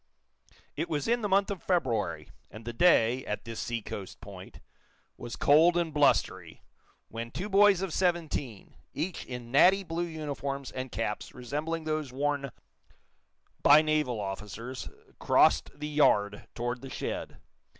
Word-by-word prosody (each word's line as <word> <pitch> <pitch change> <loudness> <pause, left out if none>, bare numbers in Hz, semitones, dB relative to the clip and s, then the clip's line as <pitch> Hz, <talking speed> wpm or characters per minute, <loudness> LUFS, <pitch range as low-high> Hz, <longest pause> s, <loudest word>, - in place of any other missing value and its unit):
It 160 +4 -3
was 150 -2 -2
in 240 +1 +2
the 205 - -1
month 195 +1 +2
of 195 - -5
February, 110 - -1 0.2
and 110 +2 -12
the 120 - -5
day, 125 -4 +4
at 105 - -4
this 115 -1 -6
seacoast 110 -4 -5
point, - - -11 0.6
was 120 - -7
cold 165 +4 +5
and 170 -3 -1
blustery, 145 -1 +1 0.5
when 115 +1 -6
two 185 - -5
boys 200 -1 +5
of 185 -5 -3
seventeen, 165 - -2 0.2
each 165 +4 -3
in 125 -2 -7
natty 185 +8 +5
blue 170 -1 -3
uniforms 140 -4 -5
and 130 -1 -5
caps 105 -2 -4
resembling 150 +6 -3
those 155 -3 -2
worn 140 +1 -1 1.1
by 150 +2 +7
naval 150 -7 0
officers, 105 +5 -6 0.3
crossed - - +4
the 150 - -4
yard 105 -9 +2
toward 120 +1 -3
the 135 - -8
shed. - - -5
145 Hz, 140 wpm, -29 LUFS, 115-165 Hz, 1.1 s, by